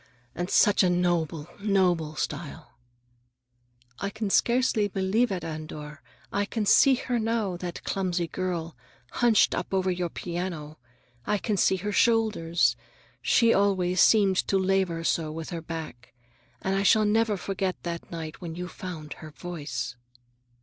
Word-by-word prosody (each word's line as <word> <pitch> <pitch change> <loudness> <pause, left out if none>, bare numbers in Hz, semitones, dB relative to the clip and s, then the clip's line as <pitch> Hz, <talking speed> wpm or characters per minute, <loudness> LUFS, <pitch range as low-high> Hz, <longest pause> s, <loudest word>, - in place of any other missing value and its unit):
And 175 +2 -3
such 205 - +4
a 185 - +4
noble, 170 -3 0
noble 180 -6 +1
style!" 150 -3 -5 1.3
"I 200 - -2
can 215 -1 -3
scarcely 235 -3 +3
believe 200 +5 +1
it, 180 -3 -3
Andor. 155 -2 -7 0.3
I 205 0 +1
can 215 +1 -2
see 270 +6 +6
her 245 -1 -2
now, 220 -4 -1
that 175 -1 -6
clumsy 180 -3 -1
girl, 170 -2 -3 0.4
hunched 235 -3 +3
up - - -3
over 190 -1 +1
your 175 -1 -2
piano. 170 -4 -5 0.5
I 210 - +2
can 210 +1 -1
see 190 0 +3
her 200 +3 -3
shoulders. 200 - +2 0.5
She 230 - +4
always 185 -2 +2
seemed 200 -4 +5
to 195 - +2
labor 190 -3 +1
so 160 -2 0
with 160 0 -6
her 170 -1 -4
back. 155 -8 -8 0.5
And 190 0 0
I 195 - +1
shall 215 +2 +4
never 215 0 +2
forget 190 0 -2
that 170 -1 -5
night 160 -2 -7
when 165 -2 -6
you 180 +1 -5
found 170 -5 -7
her 155 - -8
voice." 145 -7 -5
180 Hz, 150 wpm, -27 LUFS, 165-200 Hz, 1.3 s, see